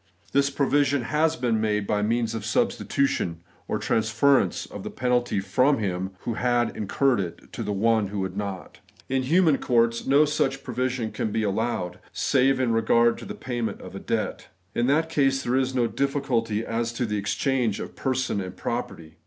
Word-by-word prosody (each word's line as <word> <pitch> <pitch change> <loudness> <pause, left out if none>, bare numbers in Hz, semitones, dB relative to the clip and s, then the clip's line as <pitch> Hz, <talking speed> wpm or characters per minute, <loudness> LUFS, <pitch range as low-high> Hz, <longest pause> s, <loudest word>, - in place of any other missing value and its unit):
This 140 0 +3
provision 140 -1 +2
has 155 +5 +1
been 120 -6 0
made 105 -2 0
by 105 +1 0
means 115 +1 0
of 115 - -3
s?/6 110 +1 +1
stitution, 135 -11 0 0.3
or - - -1
transference 110 -1 +2
of - - -9
the - - -5
penalty 125 -4 0
from 130 +9 +2
hirg 95 -3 -2
who 120 - -3
had 120 +1 +1
incurred 120 +4 +1
it 90 -3 -6
to - - -4
One 110 +1 +2
who 100 0 -3
had 95 0 -4
not. 100 -3 -5 0.3
In 130 0 +1
human 155 +2 +3
courts, 115 -2 +1
no 140 +3 +5
such 135 -2 -1
provision 125 -2 -2
can 110 - -2
be 110 - 0
allowed, 100 -4 -1
save 135 0 +2
in 125 -3 +1
regard 115 +1 +3
to - - -9
the - - -6
payment 120 -3 -3
of - - -10
debt. - - -2 0.3
In 120 - +1
that 155 +4 +3
case 135 -4 +1
there 120 - 0
is 130 0 +1
no 120 -2 +3
difficulty 115 -5 -1
as 115 0 -1
to 120 +1 -1
the 105 -2 -1
ex 100 - -2
change 125 -7 0
of - - -7
person 130 -5 -1
and 95 - -5
of - - -24
property. 85 -9 -5
120 Hz, 185 wpm, -25 LUFS, 105-135 Hz, 0.3 s, no